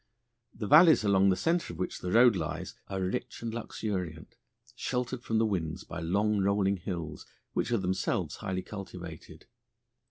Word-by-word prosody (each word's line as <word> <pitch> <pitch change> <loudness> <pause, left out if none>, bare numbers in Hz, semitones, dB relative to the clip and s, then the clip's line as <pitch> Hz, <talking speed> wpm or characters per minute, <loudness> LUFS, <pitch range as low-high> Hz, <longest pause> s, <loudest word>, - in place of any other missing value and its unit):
The 105 - -4
valleys 155 - +7
along 100 -1 +4
the 95 - +3
centre 165 - 0
of 85 - -9
which 90 - -3
the 90 - -4
road 120 0 +6
lies - - -4
are 95 - -3
rich 95 +4 -3
and 115 -1 -3
luxuriant, 95 -8 -4 0.4
sheltered 125 0 -2
from 115 - 0
the 110 - +3
winds 85 -7 -2
by - - -7
long 100 +5 +1
rolling 100 0 +2
hills, 85 -4 -5 0.3
which - - -1
are 120 - +3
themselves 95 -1 -1
highly 95 0 -3
cultivated. 90 -5 -9
100 Hz, 160 wpm, -30 LUFS, 90-115 Hz, 0.4 s, valleys